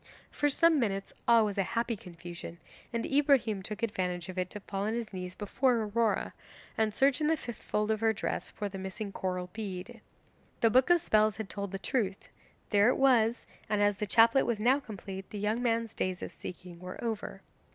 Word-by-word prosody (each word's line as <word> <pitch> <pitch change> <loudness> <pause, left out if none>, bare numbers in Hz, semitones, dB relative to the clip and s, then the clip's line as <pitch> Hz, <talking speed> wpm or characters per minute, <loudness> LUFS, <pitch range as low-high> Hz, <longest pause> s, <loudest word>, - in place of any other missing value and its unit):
For 290 - +1
some 325 +2 +4
minutes 195 -5 -1
all 230 -2 +6
was 205 -1 -2
a 195 - -1
happy 230 0 +1
confusion, 175 -2 -9 0.3
and 230 -1 -2
Ibrahim 270 -8 +3
took 210 +4 -6
advantage 180 -5 -2
of 185 - -7
it 180 0 -1
to 210 - -6
fall 195 0 -3
on 220 - 0
his 230 -3 -4
knees 180 -1 -5
before 245 +5 +1
Aurora, 220 0 0 0.4
and 220 -1 +1
search 270 +5 +3
in 300 - +2
the 320 +1 +3
fifth 240 -5 -7
fold 210 +1 0
of 215 - 0
her 225 0 +3
dress 215 - -3
for 205 - -4
the 195 -1 -7
missing 190 +2 -5
coral 180 -2 -3
bead. 210 +2 -6 0.6
The 230 - +5
Book 255 +5 +4
of 350 -1 +5
Spells 215 -8 +3
had 220 -2 -5
told 200 -2 -4
the 195 - -3
truth; 195 -2 -2 0.4
there 205 +2 +5
it - - +2
was, 240 -3 +3 0.2
and 210 0 +1
as 205 -1 +3
the 210 - -2
chaplet 230 +5 +5
was 235 -3 0
now 250 +6 +4
complete 195 -6 -8
the 210 - -6
young 210 +4 0
man's 230 -2 0
days 185 -1 -2
of - - -5
seeking 180 -1 -9
were 185 +1 -7
over. 210 -4 -4
215 Hz, 205 wpm, -31 LUFS, 195-235 Hz, 0.6 s, all